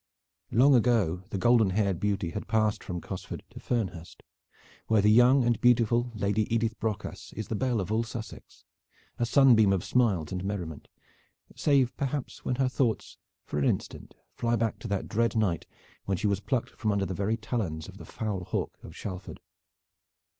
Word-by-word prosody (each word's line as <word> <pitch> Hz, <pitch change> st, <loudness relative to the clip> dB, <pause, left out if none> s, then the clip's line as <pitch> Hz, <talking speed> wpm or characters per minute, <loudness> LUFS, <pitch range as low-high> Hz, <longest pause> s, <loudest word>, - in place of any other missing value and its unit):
Long 135 Hz, +5 st, +5 dB
ago 115 Hz, -8 st, +3 dB
the -, -, -3 dB
golden 115 Hz, +1 st, +4 dB
haired 100 Hz, -2 st, 0 dB
beauty 100 Hz, -4 st, -1 dB
had 105 Hz, -, -5 dB
passed 110 Hz, -1 st, +1 dB
from 90 Hz, -2 st, -5 dB
Cosford -, -, -7 dB
to -, -, -10 dB
Fernhurst, 95 Hz, -8 st, -3 dB, 0.6 s
where 110 Hz, -1 st, +3 dB
the 105 Hz, +1 st, +5 dB
young 125 Hz, +4 st, +6 dB
and 120 Hz, -2 st, +1 dB
beautiful 120 Hz, 0 st, +3 dB
Lady 105 Hz, +1 st, 0 dB
Edith 115 Hz, 0 st, 0 dB
Brocas 110 Hz, -3 st, -4 dB
is 110 Hz, -, -6 dB
the 115 Hz, -, -1 dB
belle 125 Hz, 0 st, 0 dB
of 95 Hz, +1 st, -3 dB
all 110 Hz, +1 st, +2 dB
Sussex, 115 Hz, -1 st, -8 dB, 0.5 s
a 120 Hz, -, +1 dB
sunbeam 120 Hz, -7 st, +6 dB
of 95 Hz, -2 st, +1 dB
smiles 100 Hz, -6 st, +1 dB
and 90 Hz, -1 st, -3 dB
merriment, 90 Hz, -7 st, -5 dB, 0.7 s
save 135 Hz, -4 st, +2 dB
perhaps 140 Hz, -1 st, -3 dB
when 125 Hz, -, -1 dB
her 130 Hz, 0 st, +1 dB
thoughts 125 Hz, -3 st, -1 dB, 0.3 s
for 75 Hz, -, -3 dB
an 70 Hz, -, +1 dB
instant -, -, -2 dB, 0.2 s
fly 120 Hz, 0 st, 0 dB
back 115 Hz, -1 st, -1 dB
to -, -, -6 dB
that 100 Hz, -2 st, -2 dB
dread 115 Hz, +2 st, 0 dB
night 100 Hz, -7 st, 0 dB, 0.4 s
when 95 Hz, -2 st, 0 dB
she 100 Hz, -, -3 dB
was 100 Hz, -2 st, +2 dB
plucked 125 Hz, +3 st, -2 dB
from 110 Hz, -2 st, -1 dB
under 100 Hz, -1 st, 0 dB
the 95 Hz, -, -3 dB
very 100 Hz, +5 st, -1 dB
talons 105 Hz, -9 st, -3 dB
of -, -, -12 dB
the -, -, -9 dB
foul 105 Hz, -5 st, -4 dB
hawk -, -, -3 dB
of 80 Hz, -, -11 dB
Shalford. 95 Hz, -2 st, -7 dB
110 Hz, 180 wpm, -28 LUFS, 95-120 Hz, 0.7 s, young